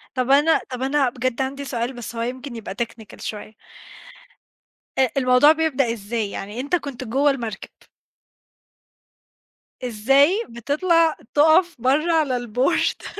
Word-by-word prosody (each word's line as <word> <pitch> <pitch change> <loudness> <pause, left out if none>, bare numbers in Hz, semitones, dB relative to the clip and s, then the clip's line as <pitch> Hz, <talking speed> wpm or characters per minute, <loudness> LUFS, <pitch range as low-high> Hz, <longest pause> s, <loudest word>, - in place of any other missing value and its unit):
طب 255 +1 0
أنا 295 +3 +4
طب 250 0 -6
أنا 270 -1 +1
بجد 255 +1 -2
عندي 275 +1 -3
سؤال 240 0 -3
بس 240 -1 -8
هو 230 - -3
يمكن 255 +1 -5
يبقى 200 -3 -7
technical 230 -2 -7
شوية. 215 0 -7 1.5
أ 260 -2 +4
الموضوع 255 +3 +5
بيبدأ 285 -7 +1
إزاي؟ 215 -1 -4
يعني 205 +5 -6
أنت 285 +7 0
كنت 275 -6 -5
جوّه 275 +5 +2
المركب. 230 -7 -6 2.1
إزاي 270 - +3
بتطلع 315 +7 +1 0.2
تُقف 320 +4 +4
برّه 305 +6 +2
على 290 -6 +1
الBoard. 250 - -1
260 Hz, 125 wpm, -22 LUFS, 235-295 Hz, 2.1 s, الموضوع